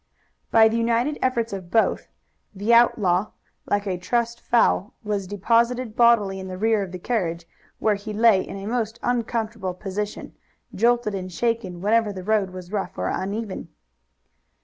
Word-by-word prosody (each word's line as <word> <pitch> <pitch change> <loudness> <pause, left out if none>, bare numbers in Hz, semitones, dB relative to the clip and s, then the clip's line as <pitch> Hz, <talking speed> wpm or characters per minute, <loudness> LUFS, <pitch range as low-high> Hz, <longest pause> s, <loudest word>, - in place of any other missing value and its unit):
By 225 -1 +6
the 225 +1 0
united 235 +5 +1
efforts 235 -4 0
of 185 -3 -6
both 225 +4 +1 0.5
the 205 +4 +1
outlaw, 210 -5 +3 0.3
like 205 0 0
a 185 -3 -2
trussed 235 +5 -1
fowl, 230 -2 +2
was 205 -3 -2
deposited 230 +4 +1
bodily 225 -5 +4
in 190 - -7
the 185 0 -6
rear 220 +1 +2
of 190 -2 -5
the 180 - -5
carriage, 175 -5 -2 0.3
where 215 - +2
he 205 +1 -6
lay 215 -2 +4
in - - -7
a 195 - -7
most 225 0 -2
uncomfortable 225 -5 -2
position, 205 +2 -5 0.4
jolted 235 0 +2
and 185 -1 -5
shaken 200 -3 -2
whenever 215 +1 +2
the 185 -2 -7
road 210 -1 +1
was 185 0 -10
rough 195 -3 -3
or - - -1
uneven. 200 -2 -4
210 Hz, 160 wpm, -23 LUFS, 190-230 Hz, 0.5 s, By